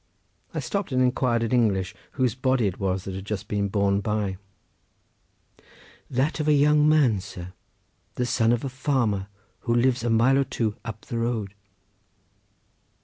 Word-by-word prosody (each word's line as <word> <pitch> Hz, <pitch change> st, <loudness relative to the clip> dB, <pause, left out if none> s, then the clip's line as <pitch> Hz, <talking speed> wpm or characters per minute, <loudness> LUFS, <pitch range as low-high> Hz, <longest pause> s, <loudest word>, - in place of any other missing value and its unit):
I -, -, -3 dB
stopped 200 Hz, -6 st, -3 dB
and 130 Hz, -, +1 dB
inquired 125 Hz, -2 st, +2 dB
in 115 Hz, -, -2 dB
English 105 Hz, -6 st, +2 dB, 0.2 s
whose 130 Hz, -5 st, +1 dB
body 130 Hz, -2 st, +1 dB
it 95 Hz, -2 st, -2 dB
was 95 Hz, -1 st, -1 dB
that 95 Hz, -, -5 dB
had 95 Hz, 0 st, -6 dB
just 100 Hz, -1 st, -4 dB
been 100 Hz, -1 st, 0 dB
borne 100 Hz, 0 st, +1 dB
by. 105 Hz, -2 st, -1 dB, 1.7 s
"That 135 Hz, +6 st, 0 dB
of 155 Hz, -, -1 dB
a 150 Hz, -, +5 dB
young 150 Hz, +1 st, +4 dB
man, 140 Hz, -10 st, +4 dB
sir, 90 Hz, -1 st, -9 dB, 0.6 s
the 125 Hz, -, 0 dB
son 120 Hz, -2 st, +2 dB
of 120 Hz, +1 st, 0 dB
a -, -, -2 dB
farmer, 125 Hz, -7 st, 0 dB, 0.3 s
who 120 Hz, -, 0 dB
lives 120 Hz, 0 st, +2 dB
a 120 Hz, -, 0 dB
mile 120 Hz, +4 st, +4 dB
or 140 Hz, -, +2 dB
so 110 Hz, -4 st, 0 dB
up 110 Hz, -2 st, -7 dB
the 115 Hz, -, -4 dB
road." 115 Hz, -4 st, -2 dB
115 Hz, 165 wpm, -25 LUFS, 100-130 Hz, 1.7 s, a